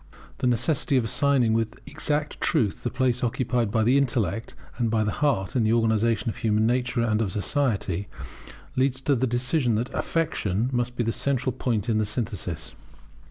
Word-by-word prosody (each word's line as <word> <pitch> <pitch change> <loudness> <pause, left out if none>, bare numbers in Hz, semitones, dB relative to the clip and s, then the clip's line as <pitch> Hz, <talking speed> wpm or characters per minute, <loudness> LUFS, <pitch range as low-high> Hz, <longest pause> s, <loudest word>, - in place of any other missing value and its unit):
The 125 - +1
necessity 130 +3 +1
of 125 - +2
assigning 125 0 +2
with 115 0 -1
exact 150 0 -2
truth 120 - +1
the 120 - -2
place 125 0 0
occupied 120 -1 0
by 110 +1 +1
the 125 +5 +4
intellect 115 -6 -1 0.2
and 120 -2 +1
by 110 -1 +2
the 105 - 0
heart 130 -10 0
in 120 - +3
the 110 +1 +3
organization 115 -1 +2
of 110 - -2
human 110 -1 +1
nature 125 0 +1
and 110 -1 +1
of 100 -4 -1
society, 100 - -1 0.7
leads 130 0 +1
to 140 +1 +2
the 130 +1 +1
decision 125 +1 +1
that 115 +4 -2
Affection 125 - -1
must 120 0 -1
be 120 - 0
the 115 - 0
central 130 +1 0
point 120 -3 -2
of 110 -2 +2
the 110 - 0
synthesis. 100 -7 -4
120 Hz, 180 wpm, -25 LUFS, 110-130 Hz, 0.7 s, the